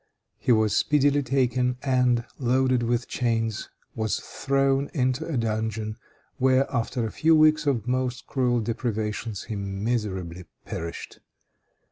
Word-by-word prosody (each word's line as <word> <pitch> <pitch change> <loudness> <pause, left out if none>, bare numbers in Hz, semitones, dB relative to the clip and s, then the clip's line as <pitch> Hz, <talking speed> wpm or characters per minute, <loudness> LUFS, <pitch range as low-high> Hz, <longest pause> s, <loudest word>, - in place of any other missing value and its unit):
He - - +1
was 110 -2 +3
speedily 145 -1 +3
taken, 125 -1 +1
and, 125 -3 +2
loaded 130 0 +2
with 120 +1 0
chains, 115 -3 -1 0.2
was 110 -1 -1
thrown 135 0 0
into 130 +3 0
a 160 -6 -2
dungeon, 110 -1 -2 0.4
where, 130 +1 +3
after 115 0 -1
a 110 - -3
few 160 +1 +3
weeks 155 -1 +4
of 120 -5 0
most 125 0 -1
cruel 125 -3 +1
deprivations, 110 -2 -3
he 110 - -5
miserably 100 -3 -3 0.2
perished. 85 0 -6
120 Hz, 125 wpm, -26 LUFS, 110-130 Hz, 0.4 s, weeks